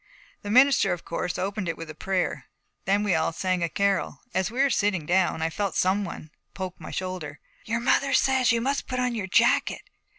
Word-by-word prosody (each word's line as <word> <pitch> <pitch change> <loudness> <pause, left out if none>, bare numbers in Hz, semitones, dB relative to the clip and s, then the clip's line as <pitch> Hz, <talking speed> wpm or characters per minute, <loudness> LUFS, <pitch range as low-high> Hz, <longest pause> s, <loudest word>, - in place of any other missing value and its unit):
The 205 - -7
minister, 250 -4 +5
of 175 - -7
course, 175 +1 -3
opened 195 -1 -2
it 165 - -3
with 160 -2 -9
prayer. 190 -2 -1 0.4
Then 200 +2 +2
we 205 -3 +1
all 160 0 +1
sang 185 +2 -1
a 170 - 0
carol. 200 +3 0
As 190 0 0
we 240 +4 -6
were 275 0 +4
sitting 195 -8 +1
down 175 -1 +1
I 165 - 0
felt 200 +2 -2
some 190 +3 +2
one 160 -4 -8 0.2
poke 185 -2 -6
my - - -8
shoulder. 180 -6 -5 0.3
'Your 230 +2 -1
mother 275 +3 +2
says 260 -3 +3
you 230 0 +1
must 275 +3 -1
put 255 -1 -2
on 250 -1 0
your 210 -5 -3
jacket. 230 +5 +2
195 Hz, 205 wpm, -26 LUFS, 175-230 Hz, 0.4 s, minister